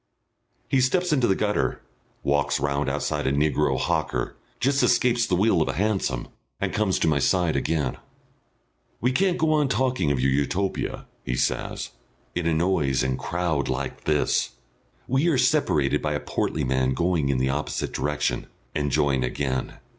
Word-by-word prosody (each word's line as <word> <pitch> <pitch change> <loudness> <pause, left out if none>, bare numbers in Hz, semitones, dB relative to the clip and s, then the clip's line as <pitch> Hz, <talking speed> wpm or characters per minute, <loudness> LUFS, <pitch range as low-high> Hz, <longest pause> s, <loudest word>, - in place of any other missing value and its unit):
He 135 - +2
steps 175 +6 +2
into 130 -5 +3
the 95 - +3
gutter, 105 +1 0 0.4
walks 70 0 +1
round 70 +1 0
outside 75 +1 -1
a - - +2
negro 75 -1 +1
hawker, - - -1 0.2
just 140 +2 +2
escapes 120 -2 +3
the 90 - +1
wheel 95 -2 +3
of - - +1
a - - -1
hansom, 95 - -1 0.3
and - - -2
comes 105 -3 +1
to - - +1
my 75 -2 +3
side 90 +1 +2
again. 75 -5 -1 1.0
"We 125 - +1
can't 185 +6 +2
go 155 -1 +2
on 150 -2 +3
talking 130 - +1
of 70 -2 +1
your 65 +1 +2
Utopia," 80 +8 -1 0.2
he - - -2
says, - - -2 0.4
"in 90 -2 -1
a 85 - +2
noise 80 -7 +1
and 65 0 -1
crowd 85 -5 -1
like - - -4
this." 70 -5 +1 0.5
We 135 +6 +2
are 160 -6 +3
separated 125 - +2
by - - -1
a - - -1
portly - - -2
man 65 0 +1
going 85 -5 +1
in 70 - +1
the 65 +1 +1
opposite 75 +2 -2
direction, 75 0 -1 0.3
and 75 -1 -1
join 70 -2 +2
again. 65 +1 -2
80 Hz, 170 wpm, -25 LUFS, 70-110 Hz, 1.0 s, into